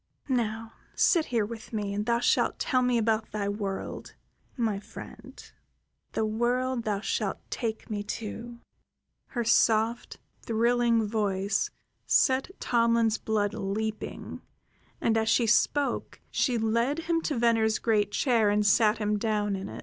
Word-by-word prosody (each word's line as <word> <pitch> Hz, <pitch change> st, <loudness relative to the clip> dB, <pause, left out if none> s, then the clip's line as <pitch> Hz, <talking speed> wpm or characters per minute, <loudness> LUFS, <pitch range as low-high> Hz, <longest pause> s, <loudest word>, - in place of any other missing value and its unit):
"Now 225 Hz, -3 st, -1 dB, 0.2 s
sit 335 Hz, -4 st, +3 dB
here 230 Hz, -4 st, 0 dB
with 220 Hz, +1 st, -9 dB
me, 205 Hz, -3 st, -2 dB
and 205 Hz, +2 st, -3 dB
thou 235 Hz, 0 st, +3 dB
shalt -, -, +2 dB
tell 255 Hz, -3 st, +1 dB
me 250 Hz, -1 st, +2 dB
about 220 Hz, -1 st, 0 dB
thy 205 Hz, -2 st, -2 dB
world, 200 Hz, -1 st, -4 dB, 0.4 s
my 220 Hz, -5 st, 0 dB
friend, -, -, -11 dB, 0.8 s
the 220 Hz, -, 0 dB
world 240 Hz, +3 st, 0 dB
thou 205 Hz, -2 st, -1 dB
shalt -, -, -1 dB
take 225 Hz, -3 st, -3 dB
me 210 Hz, -2 st, -3 dB, 0.2 s
to." 230 Hz, +2 st, -7 dB, 0.7 s
Her 240 Hz, -3 st, -2 dB
soft, 225 Hz, +1 st, +2 dB, 0.2 s
thrilling 235 Hz, 0 st, +2 dB
voice 205 Hz, -2 st, 0 dB, 0.4 s
set 265 Hz, +3 st, +3 dB
Tomlin's 230 Hz, -2 st, +2 dB
blood 210 Hz, -2 st, 0 dB
leaping; 215 Hz, +2 st, -4 dB, 0.6 s
and 225 Hz, -1 st, +2 dB
as 220 Hz, 0 st, 0 dB
she 235 Hz, -, +3 dB
spoke 275 Hz, +6 st, +1 dB
she 250 Hz, -3 st, +1 dB
led 235 Hz, +7 st, 0 dB
him 330 Hz, 0 st, 0 dB
to 295 Hz, -4 st, -2 dB
Venner's 225 Hz, -2 st, +3 dB
great 210 Hz, -3 st, +1 dB
chair 230 Hz, -2 st, +2 dB
and 210 Hz, 0 st, +2 dB
sat 215 Hz, +1 st, +4 dB
him 210 Hz, -1 st, 0 dB
down 210 Hz, -2 st, 0 dB
in 190 Hz, 0 st, -5 dB
it. -, -, -8 dB
225 Hz, 140 wpm, -28 LUFS, 210-235 Hz, 0.8 s, sat